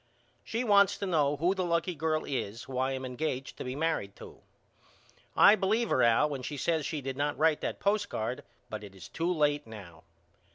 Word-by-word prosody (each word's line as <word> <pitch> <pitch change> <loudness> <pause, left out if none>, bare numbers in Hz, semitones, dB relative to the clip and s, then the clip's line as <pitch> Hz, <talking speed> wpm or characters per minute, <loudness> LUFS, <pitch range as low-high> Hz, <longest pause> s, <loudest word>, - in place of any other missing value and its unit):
She 230 +2 -2
wants 200 -3 +4
to 200 - -3
know 150 -5 +1
who 175 +5 +2
the 190 -1 -2
lucky 170 +1 0
girl 155 0 -1
is 115 -4 -4
who 130 -1 -5
I 130 +1 +1
am 130 0 -4
engaged 130 0 -4
to - - -5
be 125 0 -4
married 150 -10 -1
to. - - -13 0.9
I 205 - +8
believe 215 +4 0
her 130 - +3
Al 120 +5 +4
when 140 -3 -5
she 145 +3 -5
says 160 +1 0
she 150 - -3
did 135 0 -5
not 145 +1 -1
write 155 0 +2
that - - -3
postcard 200 - -1 0.2
but 110 -1 -6
it 100 -1 -11
is 90 -5 -11
too 170 +2 -2
late 150 -5 +1
now. 90 -7 -11
145 Hz, 205 wpm, -30 LUFS, 125-170 Hz, 0.9 s, I